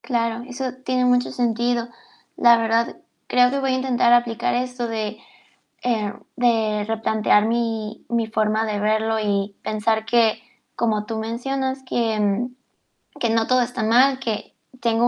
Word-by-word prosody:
Claro, 230 Hz, -2 st, -1 dB
eso 260 Hz, +1 st, -5 dB, 0.2 s
tiene 255 Hz, -1 st, +1 dB
mucho 250 Hz, 0 st, +2 dB
sentido. 240 Hz, 0 st, 0 dB, 0.5 s
La 235 Hz, -1 st, +6 dB
verdad, 230 Hz, 0 st, 0 dB, 0.3 s
creo 250 Hz, 0 st, +4 dB
que 275 Hz, -, -1 dB
voy 270 Hz, -1 st, 0 dB
a 255 Hz, -, +1 dB
intentar 245 Hz, -2 st, +2 dB
aplicar 235 Hz, -1 st, +2 dB
esto 250 Hz, -1 st, -2 dB
de 220 Hz, -1 st, -3 dB, 0.7 s
eh, 220 Hz, -4 st, 0 dB, 0.2 s
de 220 Hz, -4 st, +1 dB
replantear 220 Hz, -1 st, +2 dB
mi 225 Hz, -2 st, -2 dB
mi 235 Hz, -1 st, 0 dB
forma 220 Hz, 0 st, 0 dB
de 210 Hz, -1 st, -2 dB
verlo, 220 Hz, +1 st, +1 dB
y 200 Hz, -1 st, -1 dB
pensar 220 Hz, +1 st, 0 dB
que, 225 Hz, -1 st, +2 dB, 0.3 s
como 215 Hz, -3 st, 0 dB
tú 225 Hz, 0 st, -4 dB
mencionas, 265 Hz, +4 st, -3 dB
que 225 Hz, -2 st, 0 dB, 0.7 s
que 235 Hz, -, +1 dB
no 225 Hz, 0 st, +1 dB
todo 255 Hz, 0 st, +3 dB
está 245 Hz, -1 st, -2 dB
mal, 255 Hz, +4 st, +4 dB
que 225 Hz, -5 st, -4 dB, 0.3 s
tengo 230 Hz, +1 st, +2 dB
230 Hz, 145 wpm, -22 LUFS, 220-245 Hz, 0.7 s, La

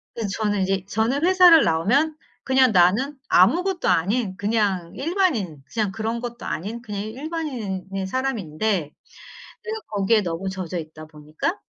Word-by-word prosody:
그래서 225 Hz, -3 st, -3 dB
저는 205 Hz, -2 st, +1 dB
인제 190 Hz, 0 st, 0 dB
저는 230 Hz, +9 st, 0 dB
회사를 360 Hz, -3 st, +7 dB
나오면 250 Hz, -, +2 dB, 0.3 s
그냥 260 Hz, -2 st, +4 dB
나는 205 Hz, +11 st, +3 dB
아무것도 345 Hz, -, +3 dB
아닌 195 Hz, +3 st, +1 dB
그냥 200 Hz, -5 st, 0 dB
일반인 270 Hz, -, -1 dB
그냥 215 Hz, -3 st, 0 dB
그런 225 Hz, +3 st, -3 dB
것도 240 Hz, 0 st, -7 dB
아닌 215 Hz, +8 st, -4 dB
그냥 205 Hz, -3 st, -5 dB
일반인인 220 Hz, -, -4 dB
사람인데 205 Hz, -, -2 dB, 0.7 s
내가 440 Hz, 0 st, -4 dB
거기에 210 Hz, +1 st, +2 dB
너무 175 Hz, +1 st, -3 dB
젖어 185 Hz, -2 st, -4 dB
있다 155 Hz, -1 st, -9 dB
보니까 155 Hz, -, -4 dB
215 Hz, 315 characters per minute, -23 LUFS, 185-265 Hz, 0.7 s, 회사를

